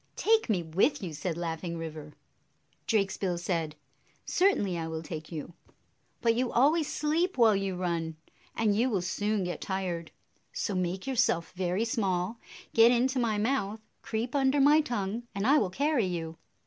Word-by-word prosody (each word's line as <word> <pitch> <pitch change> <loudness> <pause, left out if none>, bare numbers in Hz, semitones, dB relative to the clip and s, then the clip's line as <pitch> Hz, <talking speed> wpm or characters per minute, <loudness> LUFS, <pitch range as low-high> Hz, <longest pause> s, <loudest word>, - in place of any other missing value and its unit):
9 440 - 0
1 - - -6
"Take 435 - -13
me 185 -5 +1
with 185 - +1
you!" 170 -4 -4
said 160 +2 -3
Laughing 170 0 -3
River. 155 -2 -7 0.7
Drakesbill 195 -4 0
said, 165 -3 -2 0.5
"Certainly 355 - +2
I 165 -1 -3
will 160 0 -5
take 155 0 -7
you; 160 +1 -6 0.7
but 230 -1 +3
you 245 +1 0
always 295 +5 +3
sleep 320 +3 0
while 225 -4 +6
you 195 -1 -1
run, 170 -3 -2 0.4
and 215 -3 +2
you 240 +5 +2
will 195 -7 0
soon 205 +3 -1
get 180 0 -4
tired. 180 -4 -3 0.4
So 205 - -2
make 185 0 -2
yourself 230 -10 +1
very 185 +4 -1
small, 200 -1 -1 0.3
get 230 +1 +7
into 255 +2 +2
my 225 -3 +1
mouth, 220 -2 0 0.2
creep 230 +2 -3
under 275 0 +2
my 295 +3 +6
tongue, 235 -3 -3
and 200 +1 -1
I 290 +5 +5
will 200 - 0
carry 275 0 +1
you." 165 -2 -4
195 Hz, 170 wpm, -29 LUFS, 175-240 Hz, 0.7 s, get